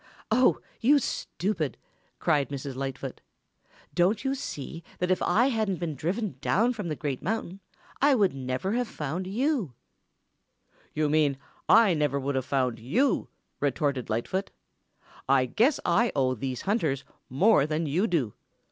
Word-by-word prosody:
"Oh, 250 +3 +4 0.2
you 280 +6 +5
stupid," 180 - -2 0.4
cried 145 -4 +1
Mrs. 140 -1 -5
Lightfoot. 135 0 -5 0.7
"Don't 195 +6 +2
you 270 0 0
see 165 - -6
that 180 +1 0
if 185 - +1
I 240 +5 +3
hadn't 220 -6 0
been 170 -2 -3
driven 175 - -3
down 230 +11 +2
from 210 -6 -5
the 155 - -2
Great 140 -3 -3
Mountain, 195 -2 -3 0.4
I 285 0 +5
never 135 - 0
would 230 - +1
have 245 - -1
found 160 +4 -4
you?" 230 - 0 1.2
"You 155 0 +2
mean, 145 -2 +2 0.3
I 220 -4 +7
never 145 -3 +1
would 140 +1 -2
have 130 -1 -1
found 130 -4 0
you," 220 - +1 0.3
retorted 140 -2 0
Lightfoot. 150 - -1 0.8
"I 135 -1 +5
guess 240 - +2
I 210 +7 +3
owe 130 -2 +2
these 130 0 -4
hunters 160 - 0 0.3
more 150 - +4
than 155 +1 -1
you 170 +9 +1
do. 145 - 0
165 Hz, 150 wpm, -27 LUFS, 135-215 Hz, 1.2 s, I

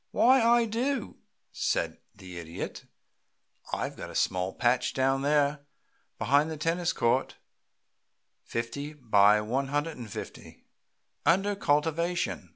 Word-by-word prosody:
"Why, 260 +2 +5
I 235 +1 +4
do," 240 +3 -2 0.3
said - - -1 0.2
the 90 -2 -9
Idiot. 80 0 -7 0.9
"I've - - -3
got - - -8
a - - -10
small 90 +1 0
patch 125 +2 +1
down 135 +1 +2
there 145 0 +2 0.6
behind 145 +3 +2
the 160 - -5
tennis 165 +3 0
court, 120 +3 0 1.1
fifty 130 +6 -4
by 105 -6 +4
one 130 +6 -1
hundred 145 +3 -2
feet, - - -9 0.6
under 195 +6 +2
cultivation. 165 +1 0
145 Hz, 115 wpm, -28 LUFS, 120-170 Hz, 1.1 s, Why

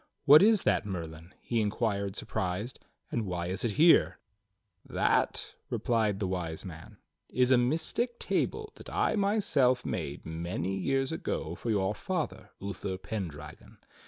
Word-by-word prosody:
"What 150 +2 +9
is 215 0 +5
that. - - +2
Merlin.^" 85 -4 -6
he 115 -2 0
inquired 100 -2 -1
surprised, 95 +7 -3 0.3
"and 115 - 0
why 90 -3 -3
is 95 +1 -1
it 115 -3 +1
here.f^" 165 +2 +1
"That," - - +1 0.2
replied 110 -4 +1
the 100 - -2
Wise 90 -3 -3
Man, 80 -3 -10 0.3
"is 125 0 +2
a 130 - +7
mystic 165 - 0
table 430 -1 -1
that - - -11
I - - +1
myself 195 - +2
made - - -4
many 85 +3 -3
years 135 +7 0
ago 80 - -3
for 115 - -5
your 100 -2 +1
father, 175 - -3
Uther 95 -1 -4
Pendragon. 80 -8 -7
105 Hz, 140 wpm, -30 LUFS, 90-135 Hz, 0.3 s, What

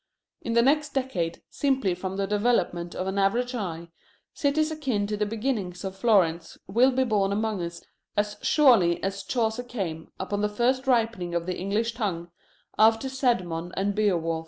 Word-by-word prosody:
In 230 - -3
the 235 0 +5
next 295 +2 +2
decade, 185 -11 -2
simply 265 -9 +1
from 190 +2 -5
the 200 - 0
development 195 -5 0
of 185 - -3
the 200 - +1
average 240 +6 +1
eye, 170 -7 -4 0.4
cities 310 +2 +1
akin 265 -10 -1
to 210 +1 -2
the 210 0 -1
beginnings 210 -5 -3
of 190 -1 -4
Florence 190 -6 +2
will 235 +7 +4
be 260 0 +1
born 205 -5 +1
among 215 -1 -1
us 170 0 -6 0.3
as 210 0 0
surely 230 - +4
as 195 0 -2
Chaucer 220 +3 -1
came, 190 -10 -5
upon 200 +2 -2
the 210 - +1
first 255 +5 0
ripening 225 -8 +1
of 170 -1 -1
the 180 0 -2
English 210 +5 -1
tongue, 180 -7 -3 0.5
after 225 +4 +4
Cædmon 185 -11 0
and 200 +1 0
Beowulf. 175 -6 +1
210 Hz, 170 wpm, -26 LUFS, 185-245 Hz, 0.5 s, the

